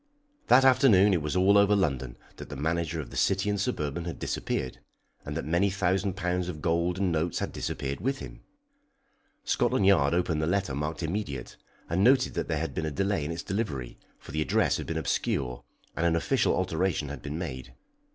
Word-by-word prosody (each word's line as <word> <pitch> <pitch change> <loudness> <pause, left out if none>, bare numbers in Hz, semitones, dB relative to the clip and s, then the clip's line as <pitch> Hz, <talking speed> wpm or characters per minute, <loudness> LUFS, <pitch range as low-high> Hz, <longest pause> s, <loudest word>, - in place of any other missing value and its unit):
That 130 - +6
afternoon 120 -7 +6
it 85 - +1
was 75 +2 -3
all 100 +2 +5
over 100 0 +4
London 70 -10 -1 0.2
that - - -9
the - - -6
manager 80 +3 -1
of - - -10
the - - -9
City 105 - +1
and 100 -1 -1
Suburban 85 - -2
had 85 - -5
disappeared, 65 - -3 0.4
and - - -5
that - - -3
many 85 +6 +2
thousand 95 0 0
pounds 90 -1 -1
of 80 -4 -6
gold 85 +3 0
and 95 -2 +1
notes 80 +1 0
had - - -2
disappeared 70 +3 -4
with 135 +5 0
him. - - -10 1.0
Scotland 120 - +1
Yard 85 -6 +4
opened 85 -3 0
the 80 - 0
letter 95 -5 0
marked 75 +4 -3
"immediate," 80 - -4 0.3
and 90 +4 +1
noted 130 +2 +4
that - - -2
there - - -1
had - - -3
been 80 - -2
a - - 0
delay 95 +2 -1
in 75 - -3
its 85 +1 -5
delivery, 75 - -3 0.2
for - - -12
the 75 +2 -1
address - - +2
had - - -6
been 80 - -2
obscure, 60 -5 -1 0.3
and 80 - -1
an 85 -1 +3
official 120 +9 +1
alteration 90 -4 -1
had 75 - -7
been 75 +1 -5
made. 70 -7 -6
85 Hz, 200 wpm, -28 LUFS, 75-100 Hz, 1.0 s, That